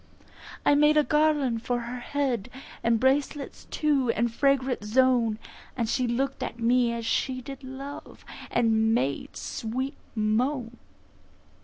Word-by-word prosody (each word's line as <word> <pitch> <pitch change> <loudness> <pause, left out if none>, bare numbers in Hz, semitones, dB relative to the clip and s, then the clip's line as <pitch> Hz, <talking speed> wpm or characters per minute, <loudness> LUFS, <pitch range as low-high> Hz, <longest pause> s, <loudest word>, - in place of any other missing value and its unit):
I - - +6
made 300 +1 +5
a 300 - +6
Garland 295 -6 +2
for 245 0 -1
her 240 +1 -5
head, 255 -4 -2 0.3
And 230 -1 +3
bracelets 275 +3 0
too, 285 -5 +1
and 235 +1 0
fragrant 265 -3 +1
Zone; 235 0 +3 0.5
She 250 +2 0
look'd 270 +3 -1
at - - -5
me 240 +1 +3
as 235 -1 -4
she 255 +3 0
did 270 +2 -9
love, 270 +2 -9 0.2
And 225 -1 +2
made 140 - -2
sweet 255 +5 -3 0.2
moan. 235 +3 0
250 Hz, 130 wpm, -27 LUFS, 230-275 Hz, 0.5 s, I